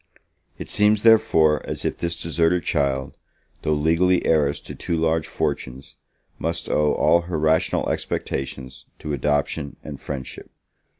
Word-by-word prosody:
It - - -7
seems, 105 0 +3
therefore, 95 -10 +4
as - - -5
if - - -1
this 85 -1 -3
deserted 85 +1 +1
child, 70 -2 -1 0.5
though 75 - 0
legally 85 +4 +2
heiress 75 -3 +2
to - - -9
two 85 - -3
large 80 0 0
fortunes, 65 +1 -4 0.4
must 85 +1 -3
owe 75 -1 +2
all 85 - +3
her 85 - -1
rational 80 +1 +1
expectations 65 -1 -4
to 75 - -5
adoption 70 0 -1
and 75 -3 -8
friendship. 65 -3 -7
80 Hz, 135 wpm, -23 LUFS, 70-85 Hz, 0.5 s, therefore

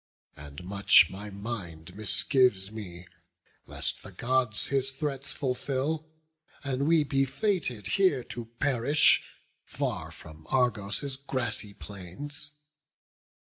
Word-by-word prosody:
And 70 +2 -10
much 100 +2 +6
my 100 +2 -6
mind 95 -5 -6
misgives 105 -1 +2
me, 90 -5 -8 0.6
lest - - -3
the - - -10
Gods 125 -3 0
His 135 -1 +1
threats 140 0 -3
fulfil, 140 +4 -1 0.5
and 140 0 0
we 165 -1 +5
be 135 -1 +2
fated 135 - 0
here 140 - +3
To 120 -1 -6
perish, 145 +2 +4 0.4
far - - -2
from 80 0 -12
Argos' 125 +1 +1
grassy 125 -6 -2
plains. 105 - -7
125 Hz, 105 wpm, -29 LUFS, 100-140 Hz, 0.6 s, much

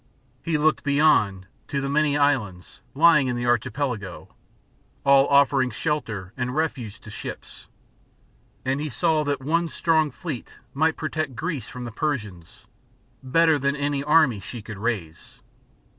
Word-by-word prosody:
He 165 -2 0
looked 155 +1 +2
beyond, 140 -10 +3 0.2
to 140 - -2
the 135 - -2
many 145 0 +2
islands, 110 -11 -1
lying 155 -2 +5
in 125 - -1
the 120 0 -3
Archi 120 -2 +1
pelago, 115 -6 -4 0.8
all 140 0 +6
offering 140 -2 +4
shelter 110 - -3
and 125 0 -3
refuge 125 -9 -2
to 105 - -11
ships, - - -9 1.0
and 135 +2 0
he 155 - -3
saw 160 +2 +1
that 140 -2 -2
one 170 +4 +1
strong 160 -1 +1
fleet, 145 -2 -7 0.2
might 160 +3 +1
protect 155 -4 -3
Greece 150 -5 -3
from 125 0 -7
the 120 - -6
Persians, 105 - -4 0.6
better 160 +3 +3
than 140 +1 0
any 145 -1 -1
army 150 -7 +4
she 110 +3 -8
could 110 -3 -8
raise. 100 -8 -4
140 Hz, 145 wpm, -24 LUFS, 120-155 Hz, 1.0 s, all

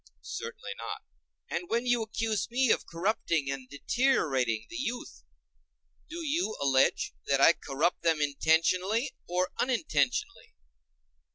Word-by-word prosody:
Certainly 470 +1 -6
not. - - -5 0.5
And 355 - -3
when 235 +2 0
you 245 -1 +2
accuse 220 -1 -1
me 255 0 +3
of - - +1
corrupting 165 -5 0
and 130 -2 -6
deteriorating 140 - +1
the - - -10
youth, 250 -2 -4 0.9
do 335 +1 -5
you 295 -6 0
allege 135 -1 +2
that 140 0 +2
I 165 - +7
corrupt 155 +3 -1
them 165 -2 +2
intentionally 180 - +2 0.2
or 180 +1 0
unintentionally? 155 - 0
180 Hz, 120 wpm, -29 LUFS, -, 0.9 s, I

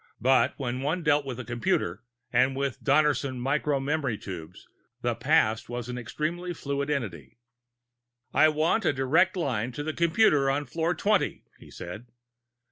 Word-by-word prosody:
But 130 +1 +3
when 125 -2 -3
one 160 +6 -1
dealt 145 -2 +2
with 130 -2 -5
a 130 - -6
computer 120 -7 -1 0.3
and 130 +1 +3
with 140 -2 -3
Donnerson 140 -2 +2
micro 140 +2 0
memory 140 -4 -1
tubes, 90 -6 -9 0.4
the - - +1
past 110 +1 +2
was 120 0 -5
an 125 - -4
extremely 170 +8 -3
fluid 140 -1 -3
entity. 95 - -4 1.0
"I 155 - +6
want 155 +8 +1
a 155 - +2
direct 160 +9 +2
line 125 -8 -1
to 145 - -4
the 155 +1 -3
computer 165 -5 +3
on 145 +2 0
floor 165 +6 -1
twenty," 205 -1 +1 0.2
he - - -15
said. 105 +8 -8
140 Hz, 155 wpm, -27 LUFS, 125-155 Hz, 1.0 s, I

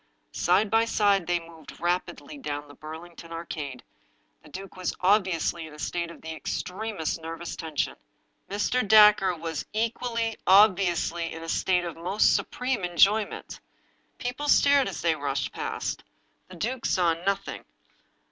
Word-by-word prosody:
Side 215 -1 +2
by 225 0 +4
side 200 -5 +2
they 175 0 +2
moved 165 -2 -13
rapidly 175 - -2
down 145 - -5
the 145 - -13
Burlington 165 +3 -10
Ar 165 +1 -5
cade. 140 -7 -6 0.6
The - - -16
duke 190 +5 -9
was 185 -1 -3
obviously 180 -4 +1
in 150 - -12
a - - -13
state 170 +2 -3
of 170 - -12
the 160 0 -5
extremest 180 -2 -3
nervous 165 +1 -6
tension. 160 -3 -2 0.5
Mr. 210 +5 +1
Dacre 210 -3 +7
was 165 -1 -4
equally 230 0 -1
obviously 185 -4 +4
in 165 0 -7
a - - -7
state 180 0 +1
of 170 - -4
the 165 - -14
most 195 +5 +3
supreme 250 -5 -2
enjoyment. 195 +5 +2 0.6
People 250 +4 -4
stared 285 -2 +5
as - - -5
they 165 -1 +3
rushed 140 -2 -2
past. - - -4 0.4
The 185 - -12
duke 240 +8 -2
saw 175 -3 +3
nothing. 190 +4 -3
180 Hz, 150 wpm, -27 LUFS, 165-210 Hz, 0.6 s, Dacre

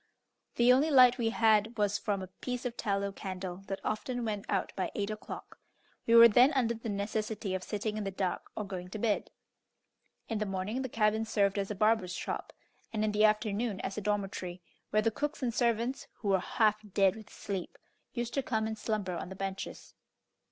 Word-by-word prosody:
The 240 +1 +6
only 280 +5 +3
light 255 -3 +7
we 225 -1 +2
had 225 0 +3
was 205 -1 +1
from 205 -4 -1
a - - -6
piece 250 0 -3
of 245 -1 -2
tallow 200 -1 -1
candle, 185 -2 -5
that 195 - -3
often 245 +3 -2
went 210 -2 -3
out 195 - 0
by 190 - -1
eight 205 0 -1
o'clock. 215 - -8 0.5
We 230 - +5
were 230 0 +11
then 245 +5 +6
under 245 -4 +2
the 225 0 -6
necessity 210 0 -2
of 190 - -1
sitting 210 0 -3
in 215 - -2
the 195 - -2
dark 190 -1 -3
or 215 - -2
going 185 -2 -6
to 215 - -5
bed. 215 -1 0 1.0
In 225 -2 -2
the 215 - -1
morning 195 +6 -2
the 260 - -3
cabin 220 -1 +2
served 200 -2 +1
as 195 - -2
a 210 - -3
barber's 215 -3 +2
shop, - - -4 0.4
and 215 -2 0
in 215 - +1
the 210 +1 +4
afternoon 215 0 +1
as 195 - -4
a 210 - -3
dormitory, 195 -3 -2 0.3
where 215 +1 +2
the 225 - +2
cooks 295 +4 -3
and 240 -2 0
servants, 235 +2 0
who 205 - -4
were 190 -1 +4
half 215 +2 +2
dead 195 -2 +4
with 220 -1 -11
sleep, 190 -3 -5 0.3
used 240 -1 -3
to 275 - +1
come 220 -4 -1
and 220 -1 -4
slumber 205 -5 -2
on 170 - -5
the 190 - -7
benches. 195 0 -5
215 Hz, 205 wpm, -31 LUFS, 195-230 Hz, 1.0 s, were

